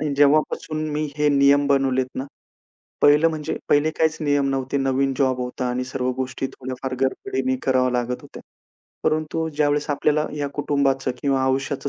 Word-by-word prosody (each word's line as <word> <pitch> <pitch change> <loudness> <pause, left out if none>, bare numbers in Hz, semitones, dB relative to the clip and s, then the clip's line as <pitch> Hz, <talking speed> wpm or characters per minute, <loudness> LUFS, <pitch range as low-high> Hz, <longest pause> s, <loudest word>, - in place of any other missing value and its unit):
आणि 150 -2 -1
जेव्हापासून 155 +2 +2
मी 150 +1 -1
हे 150 0 +2
नियम 140 0 +4
बनवलेत 135 -2 +2
ना 130 - -2 0.8
पहिलं 150 +3 +6
म्हणजे 155 -1 -4
पहिले 145 +2 +3
काहीच 160 0 +2
नियम 145 -2 +1
नव्हते 135 0 -2
नवीन 135 0 +1
जॉब 130 -1 +1
होता 125 0 -3
आणि 125 +1 -2
सर्व 130 -1 -2
गोष्टी 130 +1 -3
थोड्याफार 130 0 -6
गडबडीने 260 - -1
कराव्या 130 -1 +2
लागत 125 +1 -4
होत्या. - - -11 0.6
परंतु 155 +1 0
ज्यावेळेस 150 0 +1
आपल्याला 150 +1 +1
ह्या 145 -1 -3
कुटुंबाचं 135 -2 0
किंवा 135 -2 +1
आयुष्याचं 135 +1 -1
140 Hz, 155 wpm, -22 LUFS, 130-150 Hz, 0.8 s, पहिलं